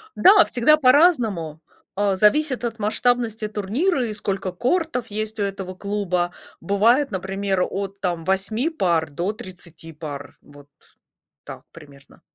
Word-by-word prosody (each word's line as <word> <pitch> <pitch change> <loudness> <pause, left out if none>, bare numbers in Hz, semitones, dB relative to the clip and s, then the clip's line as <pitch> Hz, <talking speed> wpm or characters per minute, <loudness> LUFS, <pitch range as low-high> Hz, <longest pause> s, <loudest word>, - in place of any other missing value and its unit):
Да, 395 +3 +7
всегда 255 +6 +3
по-разному, 250 - +3 0.4
э, 200 -1 +1
зависит 255 +6 +3
от 230 -2 -4
масштабности 225 0 0
турнира 240 - -1
и 220 - -3
сколько 195 -2 -3
кортов 250 - -1
есть 215 +1 -5
у - - +1
этого 195 -2 -5
клуба. 185 -3 -2 0.3
Бывает, 225 - +2
например, 195 0 -2
от 195 0 -5
там 175 -4 -2
8 200 - +1
пар 170 - 0
до 175 +8 -2
30 175 -6 -8
пар, 145 -2 -8
вот 145 0 -17 0.8
так - - -10
примерно. 140 -4 -17
200 Hz, 130 wpm, -22 LUFS, 180-240 Hz, 0.8 s, Да